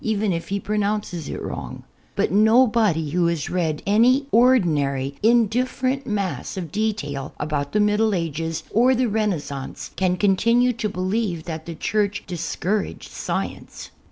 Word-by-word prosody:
even 215 -3 0
if 165 0 -4
he 200 +1 -1
])ron()unces 205 -6 -2
it - - -4
wrong. - - -6 0.3
l>ut - - +1
no 220 +6 +5
l)odv 190 -10 +1
who 175 +1 +2
has 170 -4 -2
read 160 -4 -1
anv 245 +7 +4
ordinarv 150 - +3
indifferent 250 +4 +1
mass 200 -3 -3
of 170 -5 -5
de 215 +4 +1
ANTI - - -1
CATHOJ.IC - - -6
HISTORY 145 -1 -5
tail 140 0 -6
about 150 -2 -2
the - - 0
iMiddle 210 0 +2
Ages 165 -1 -3
or 250 +4 +4
the 250 +1 +2
Renaissance 175 -11 -3
can 185 -1 +1
con 195 0 +3
tinue 240 +4 +3
to 220 -2 -2
beHeve 185 -2 -2
that 160 -1 -6
the 170 - -5
Church 205 +3 -1
discouraged 190 +3 -3
science. - - -5
200 Hz, 165 wpm, -23 LUFS, 165-220 Hz, 0.3 s, no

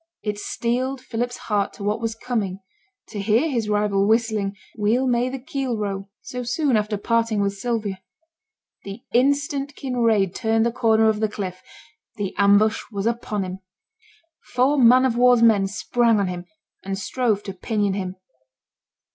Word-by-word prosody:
It 210 -1 -3
steeled 250 +5 -2
Philip's 245 0 -3
heart 205 -2 -1
to 200 - -9
what 210 +2 -1
was 225 -1 -2
coming 220 -6 -3 0.5
to 210 - -6
hear 225 +10 +2
his 230 -5 -1
rival 205 -1 +2
whistling, 220 -3 +1 0.2
'Weel 225 +5 +1
may 245 0 +1
the 265 - -4
keel 265 -3 -3
row,' 200 -1 -4
so 250 - -6
soon 255 +2 0
after 210 0 0
parting 230 0 0
with 200 0 +1
Sylvia. 205 -2 -3 0.8
The 200 +5 -8
instant 280 +2 +1
Kinraid 230 -8 +1
turned 225 -1 +1
the 235 - +1
corner 225 -2 +3
of 215 -1 +2
the 215 -1 +1
cliff, 185 -3 -5 0.5
the 200 -3 -3
ambush 205 +2 +4
was 200 -1 -3
upon 230 -3 -1
him. 185 0 -6 1.0
Four 270 +4 +3
man 250 +1 +6
of 240 -2 0
war's 245 -1 +5
men 210 -4 +5
sprang 230 +2 +1
on 200 - +1
him 175 0 -5 0.4
and 195 0 -3
strove 215 -1 -1
to 195 - -6
pinion 205 +1 -1
him. 190 -1 -4
220 Hz, 160 wpm, -23 LUFS, 200-245 Hz, 1.0 s, man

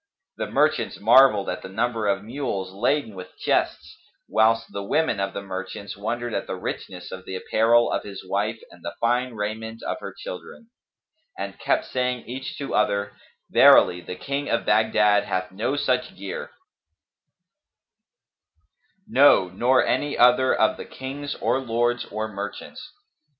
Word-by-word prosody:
The - - -3
merchants - - +1
marvelled 130 -7 +6
at - - -3
the 95 - -8
number 115 +2 -1
of 100 -1 0
mules 105 -6 -4
laden 120 +3 0
with 90 -1 -11
chests, - - -1 0.3
whilst 115 +1 +2
the 100 - -3
women 135 +2 0
of 95 0 -1
the 100 - -4
merchants 95 +1 -6
wondered 120 +3 -3
at - - -2
the - - -3
richness 90 -2 -6
of 95 0 -8
the 95 - -6
apparel 115 +5 +3
of - - 0
his 100 -2 -9
wife 105 +4 -1
and - - -17
the - - -5
fine 120 +1 0
raiment 110 +2 -5
of - - -3
her - - -7
children; 225 - -10 0.7
and - - -6
kept 320 -1 +1
saying 125 -1 -2
each 130 +3 -6
to 140 - -5
other, 100 -1 0 0.4
"Verily, 90 0 +6
the 90 - -7
King 140 +8 -3
of 115 - 0
Baghdad 105 -2 +3
hath 95 0 -2
no 110 +8 -2
such 130 -3 -1
gear; 100 0 -6 2.6
no, 140 - +5
nor 120 +8 +2
any 145 0 0
other 125 +1 +5
of - - +2
the - - -7
kings 145 +2 -6
or 130 - 0
lords 120 -1 0
or 110 +1 -4
merchants!" 105 - -7
110 Hz, 155 wpm, -24 LUFS, 100-125 Hz, 2.6 s, marvelled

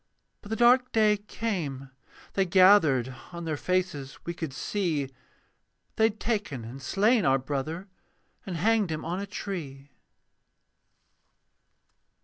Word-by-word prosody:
But 205 - -12
the 220 - -1
dark 250 +2 +4
day 215 -1 +4
came: 175 - -4 0.4
they 195 - +2
gathered: 170 - +5 0.2
On 170 -1 -6
their 155 -1 -1
faces 175 -5 -2
we 170 - -3
could 160 -4 -5
see 150 -3 -2 0.8
They 220 - +4
had 220 -1 -1
taken 205 - -2
and 130 +4 -9
slain 210 - +2
our 135 -2 +4
brother, 145 +7 -4 0.6
And 180 -3 -5
hanged 215 +2 +2
him 155 - -4
on 175 +3 -2
a 200 - -5
tree. 145 -9 -6
175 Hz, 130 wpm, -28 LUFS, 140-205 Hz, 0.8 s, gathered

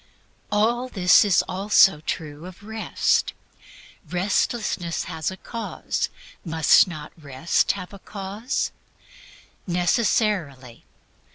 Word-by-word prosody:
All 235 +4 +1
this 185 +1 +5
is 205 -3 +3
also 195 -3 +4
true 155 +1 -5
of 185 +2 -13
Rest. 220 +1 0 0.8
Restlessness 185 -2 -1
has 160 -3 -3
a 190 - -8
cause: 230 +4 -4 0.3
must 160 -1 +4
not 155 -4 -8
Rest 145 +1 0
have 190 -1 -8
a 200 - -10
cause? 205 +6 -4 1.0
Necessarily. 175 - 0
185 Hz, 95 wpm, -23 LUFS, 160-210 Hz, 1.0 s, this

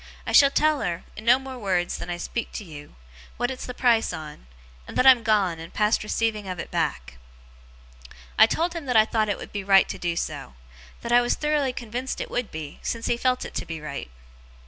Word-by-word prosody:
I - - -3
shall 280 - +7
tell 305 +1 +2
her, 175 -1 -3
in 215 - -9
no 245 +2 +6
more 265 -1 -8
wureds 185 -5 -1
than - - -7
I 175 - -3
speak 230 +6 -4
to - - -5
you, 150 - -11 0.4
what 245 +2 -1
it's 260 - -7
the 250 - -5
price 235 -3 +3
on; 155 - -9 0.4
and - - -7
that 255 - +3
I'm 260 -3 +8
gone, 205 -7 +1
and 165 +1 -9
past 210 +1 +1
receiving 215 -1 -1
of 185 -1 -4
it - - -7
back.' 60 -1 -2 1.2
I 220 - +7
told 335 +7 -1
him 330 -5 -6
that 250 -3 +3
I 215 - +7
thought 220 -1 0
it 200 - 0
would - - -9
be 205 -1 -3
right 195 0 +5
to - - -5
do 175 -1 -1
so 65 - -5 0.5
that 235 - -5
I 240 0 +6
was 240 - +1
thoroughly 300 -3 0
convinced 245 +2 -5
it - - -5
would 245 -3 -2
be, 155 -2 -8
since 230 -1 -3
he - - +1
felt 250 +1 0
it - - -9
to - - -3
be 165 -1 -5
right. 145 - -6
220 Hz, 230 wpm, -25 LUFS, 175-250 Hz, 1.2 s, I'm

